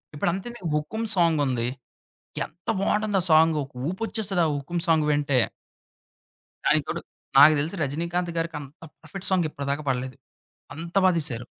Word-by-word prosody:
ఇప్పుడంతేందుకు 190 +5 -3
'హుకుమ్' 220 +10 -2
సాంగుంది, 145 -9 +2 0.8
ఎంత 175 +2 -20
బావుంటుంది 210 0 +1
ఆ - - +1
సాంగు 160 0 +5
ఒక 135 - -21 0.2
ఊపొచ్చేస్తది 195 -1 -2
ఆ - - +2
'హుకుమ్' 165 +5 -3
సాంగ్ 160 -2 +3
వింటే. 145 -3 +2 1.3
దానికి - - +3
తోడు, - - -3 0.4
నాకు 150 +3 +9
తెలిసి 160 +6 -2
'రజినీకాంత్' 170 +4 -2
గారికి 165 -1 -2
అంత 140 -1 -11 0.3
పర్ఫెక్ట్ 195 0 -2
సాంగ్ 175 -4 +2
ఇప్పటిదాకా 140 +1 -3
పాడలేదు 130 0 -2 0.6
అంత 170 +4 -8
బా - - +7
తీశారు. 125 -7 -2
165 Hz, 140 wpm, -25 LUFS, 145-180 Hz, 1.3 s, నాకు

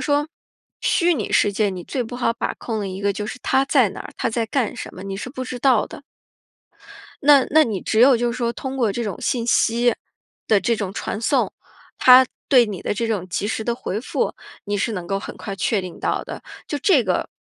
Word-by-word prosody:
说 290 +1 +2 0.5
虚 350 -1 +2
拟 225 -10 -3
世 205 - +3
界 210 +1 +1
你 185 -2 -6
最 255 - -2
不 240 +2 -7
好 235 -2 +1
把 - - -3
控 220 -3 -4
的 195 - -3
一 190 +1 -6
个 200 0 +2
就 210 +2 -4
是 255 - -6
他 265 - +2
在 255 -9 +3
哪 - - -9
儿， - - -8
他 230 - -1
在 225 0 -1
干 250 -1 -1
什 - - -8
么， 185 - -9
你 195 -1 -5
是 255 - -5
不 255 -1 -6
知 250 -1 -6
道 255 -4 +3
的。 - - -11 1.2
那 280 -2 +6
那 310 +1 +6
你 210 -5 -3
只 220 - 0
有 255 0 +7
就 240 0 0
是 245 - -6
说 235 -1 0
通 265 0 -5
过 225 -5 +2
这 235 +3 -3
种 205 -5 -4
信 235 -2 -1
息 240 +1 +3 0.5
的 210 -2 +4
这 235 - +1
种 200 -3 -4
传 215 - -4
送， - - +1 0.5
他 255 0 +8 0.2
对 250 -3 +6
你 200 -4 -6
的 - - -1
这 230 +2 -2
种 195 -5 -2
及 205 - -2
时 220 0 -2
地 235 - 0
回 220 -4 -4
复， - - -1 0.3
你 205 0 -1
是 225 - -1
能 180 -4 -5
够 195 0 -1
很 - - -8
快 195 -1 -6
确 195 +1 0
定 180 -2 -8
到 - - -1
的。 - - -8 0.3
就 290 - -2
这 290 - +4
个， 185 -2 -1
230 Hz, 255 characters per minute, -22 LUFS, 200-255 Hz, 1.2 s, 他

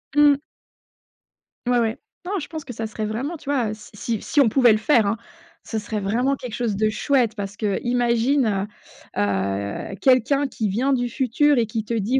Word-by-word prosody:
Mmh. 295 -1 +6 1.3
Ouais, 245 -1 +3
ouais, 225 -1 0 0.3
non, 390 +1 -1
je 290 - -6
pense 315 -2 -6
que 250 - -7
ça 225 0 -4
serait 215 0 -4
vraiment, 260 +10 -3
tu 285 - -10
vois? 240 -7 +1
Si 215 0 -12
si 220 +1 -3
si 290 - +2
on 250 - +5
pouvait 240 -1 +5
le - - +2
faire, 225 0 +3
hein, 200 +2 +1 0.5
ce 220 - -3
serait 210 0 -4
vraiment 245 +8 +1
quelque 250 -4 -8
chose 235 -4 -1
de 215 +2 +2
chouette 240 0 +1
parce 200 0 -5
qu'imagine, 235 0 +1 0.5
heu - - +2
heu, 100 - -2
quelqu'un 270 +2 +3
qui 225 -5 -2
vient 245 +8 0
du 245 -2 +1
futur 265 +4 +2
et 235 - +3
qui 220 0 -4
te 235 - -3
dit: 230 +4 +1
235 Hz, 195 wpm, -23 LUFS, 215-270 Hz, 1.3 s, Mmh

